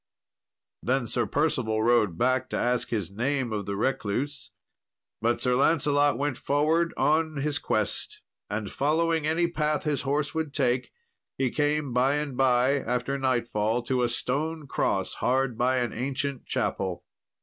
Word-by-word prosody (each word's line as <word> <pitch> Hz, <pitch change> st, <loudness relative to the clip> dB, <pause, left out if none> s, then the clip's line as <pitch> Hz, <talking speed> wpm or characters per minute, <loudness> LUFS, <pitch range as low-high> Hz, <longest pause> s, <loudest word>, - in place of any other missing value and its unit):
Then 130 Hz, 0 st, 0 dB
Sir 115 Hz, 0 st, 0 dB
Percival 115 Hz, -6 st, 0 dB
rode 110 Hz, -7 st, +3 dB
back 130 Hz, +3 st, +1 dB
to -, -, -2 dB
ask 125 Hz, 0 st, 0 dB
his 100 Hz, -5 st, -2 dB
name 125 Hz, +2 st, -1 dB
of 105 Hz, -2 st, -3 dB
the 100 Hz, -, -2 dB
recluse; 130 Hz, +4 st, -2 dB, 0.7 s
but 120 Hz, +1 st, +1 dB
Sir 125 Hz, -1 st, +2 dB
Lancelot 145 Hz, 0 st, +3 dB
went 145 Hz, -2 st, -2 dB
forward 155 Hz, +4 st, +2 dB
on 155 Hz, +1 st, +2 dB
his 145 Hz, +1 st, -1 dB
quest, 105 Hz, -2 st, -2 dB, 0.3 s
and 105 Hz, -1 st, -3 dB
following 160 Hz, +2 st, +1 dB
any 165 Hz, +2 st, +2 dB
path 155 Hz, -2 st, 0 dB
his 150 Hz, -3 st, 0 dB
horse 145 Hz, +2 st, -1 dB
would 160 Hz, -3 st, -3 dB
take, 130 Hz, -3 st, +1 dB, 0.5 s
he 130 Hz, -2 st, 0 dB
came 145 Hz, -3 st, 0 dB
by 130 Hz, +3 st, +3 dB
and 145 Hz, -3 st, -2 dB
by 130 Hz, +1 st, +3 dB
after 125 Hz, +3 st, -2 dB
nightfall 120 Hz, -3 st, 0 dB
to 125 Hz, +1 st, 0 dB
a 120 Hz, -, +2 dB
stone 150 Hz, +6 st, -2 dB
cross 140 Hz, -, -1 dB
hard 130 Hz, -1 st, +1 dB
by 125 Hz, +3 st, +2 dB
an 120 Hz, -3 st, -1 dB
ancient 140 Hz, +2 st, -3 dB
chapel. 95 Hz, -3 st, -2 dB
130 Hz, 150 wpm, -27 LUFS, 120-145 Hz, 0.7 s, rode